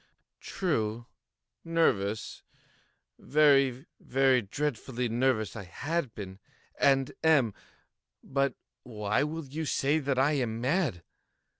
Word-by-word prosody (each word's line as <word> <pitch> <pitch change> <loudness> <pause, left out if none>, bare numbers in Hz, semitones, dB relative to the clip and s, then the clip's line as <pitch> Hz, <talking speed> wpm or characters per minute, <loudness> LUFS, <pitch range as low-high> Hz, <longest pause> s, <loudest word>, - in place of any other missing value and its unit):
True!—nervous—very, 135 +1 0
very 130 -1 +3
dreadfully 125 +1 -3
nervous 115 -4 0
I 105 -3 -7
had 145 - -3
been 95 -2 -8 0.4
and 135 -1 +3
am; 140 -9 +4 0.7
but 140 0 0 0.3
why 105 -1 -1
will 155 +2 -3
you 155 +4 -5
say 145 +2 +1
that 140 -3 -1
I 135 +3 +3
am 120 -6 -1
mad? 130 - 0
135 Hz, 95 wpm, -29 LUFS, 110-145 Hz, 0.7 s, am